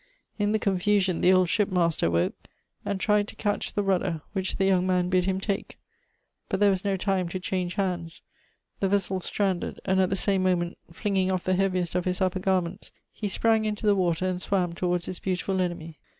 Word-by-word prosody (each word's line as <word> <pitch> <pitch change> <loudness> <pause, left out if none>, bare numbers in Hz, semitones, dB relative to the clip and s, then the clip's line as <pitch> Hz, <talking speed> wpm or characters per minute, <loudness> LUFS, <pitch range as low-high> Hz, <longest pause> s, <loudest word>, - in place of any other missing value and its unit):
In 205 0 +2
the 220 - +3
confusion 195 -2 +1
the 180 - +5
old 185 -1 +4
ship 210 +3 +1
master 170 - +2
woke, 85 0 +1 0.5
and 200 - -2
tried 210 +1 +2
to - - -10
catch 205 -1 -2
the 205 - +1
rudder, 185 -4 0
which 190 -2 -2
the 195 - +1
young 185 -1 +3
man 180 -1 +1
bid 180 -1 +2
him 190 0 0
take. 200 +1 -3 0.7
But 190 - -1
there 205 -1 +5
was 190 -1 -1
no 200 -2 0
time 185 -2 0
to 185 - -4
change 180 -1 -2
hands. 175 -4 -3 0.6
The 195 - +1
vessel 190 -1 0
stranded; 190 -1 -2
and 190 0 +3
at 185 - +2
the 195 - 0
same 195 0 +1
moment, 180 -2 0
flinging 190 +1 0
off 185 -2 -1
the 185 - +1
heaviest 185 -2 0
of 180 0 -1
his 180 0 -1
upper 185 -1 +1
gai 190 0 +2
ments, 175 +4 -8 0.2
he 210 - -3
sprang 220 +3 +2
into 215 0 -3
the 205 -1 +5
water 180 -2 +1
and 185 -1 -1
swam 185 -3 0
towards 175 0 -1
his 185 - -5
beautifUl 190 0 -1
enemy. 165 -3 -4
185 Hz, 210 wpm, -26 LUFS, 180-195 Hz, 0.7 s, the